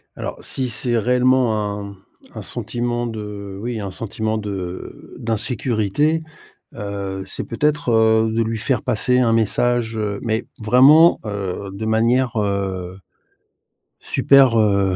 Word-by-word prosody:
Alors, - - -5
si 130 -2 -2
c'est 120 +1 0
réellement 120 -3 +1
un 100 0 -8 0.4
un - - -5
sentiment 120 0 -3
de 105 -3 -7
oui 120 0 -3
un 100 -2 -5
sentiment 110 +2 -3
de 95 -4 -7
d'insécurité, 120 +6 0 0.5
heu, 100 -1 -5
c'est - - -5
peut-être, 150 +3 0
heu, 110 0 +3
de 115 +1 +1
lui 115 0 -2
faire 125 +4 0
passer 125 +3 +1
un 120 -2 +3
message, 115 +1 +1
heu, 105 -2 -2
mais 115 0 -1
vraiment, 135 +9 +6
heu, 100 -2 -4
de 105 +3 -5
manière, 120 +3 +2
heu, 95 -3 -2 1.0
super, 135 -4 +4
heu, 100 -3 +2
110 Hz, 130 wpm, -20 LUFS, 100-120 Hz, 1.0 s, vraiment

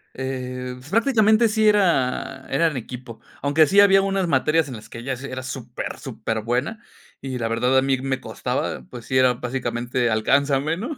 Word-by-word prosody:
Eh, 125 -1 -4 0.2
prácticamente 225 0 +4
sí 215 0 +2
era, 135 -9 +1
era 165 +5 +3
en 150 - -5
equipo, 125 -1 -8 0.2
aunque 145 +3 +4
sí 200 +7 +5
había 195 -1 +6
unas 195 -1 0
materias 155 +1 +2
en 125 - -6
las 110 0 -12
que - - -9
ella 135 +3 -3
s 130 +2 -6
era 130 0 -5
súper, 125 -2 -6
superbuena, 120 - -3 0.4
y 130 -1 -5
la 115 -1 -1
verdad 125 +3 +1
a 130 - +5
mí 135 -1 +1
me 135 0 -2
costaba, - - -3
pues 120 -2 -9
sí 130 - +1
era 130 -1 +4
básicamente 120 0 -2
"alcánzame", 140 +7 +1
¿no?, 280 +9 -4
130 Hz, 180 wpm, -22 LUFS, 125-165 Hz, 0.4 s, había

